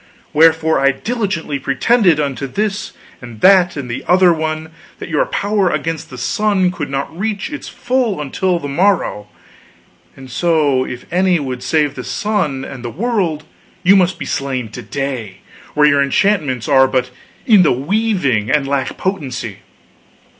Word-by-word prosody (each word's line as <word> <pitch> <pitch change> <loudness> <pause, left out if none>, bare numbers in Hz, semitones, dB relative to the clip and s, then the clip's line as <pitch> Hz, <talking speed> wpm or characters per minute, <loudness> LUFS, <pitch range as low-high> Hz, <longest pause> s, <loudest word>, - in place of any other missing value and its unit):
Wherefore 160 0 +4
I 140 0 +3
diligently 190 - -3
pretended, 160 - +2
unto 140 -1 -2
this 205 +7 -3 0.3
and 120 -3 -10
that 185 -3 +5
and 140 -3 -5
the 120 - -5
other 180 -1 +5
one, 155 0 -3 0.3
that - - -8
your - - +1
power 205 - 0
against 160 0 -3
the 130 - -9
sun 190 - +1
could 150 -6 -5
not 140 +3 -4
reach 205 - -3
its 290 - -7
full 245 -6 -1
until 175 +5 -1
the 145 - -5
morrow; 160 - 0 0.9
and 130 -1 -11
so 145 -4 +1
if 125 -1 -7
any 180 -1 +3
would 130 -3 -4
save 145 +2 +1
the 125 - -7
sun 150 - -2
and 130 -3 -9
the 120 - -4
world, 185 - -1 0.4
you 190 +2 +6
must 185 -1 +2
be - - -6
slain 130 -4 -3
to 125 - -8
day, 120 -5 -5 0.3
while 150 0 +5
your 140 -1 +4
enchantments 140 - +1
are 135 -2 +5
but 130 -1 -1 0.3
in 215 -5 +6
the 170 - +4
weaving 145 - 0
and 145 -2 +1
lack 135 -1 -2
potency. 130 - -4
155 Hz, 160 wpm, -17 LUFS, 135-190 Hz, 0.9 s, you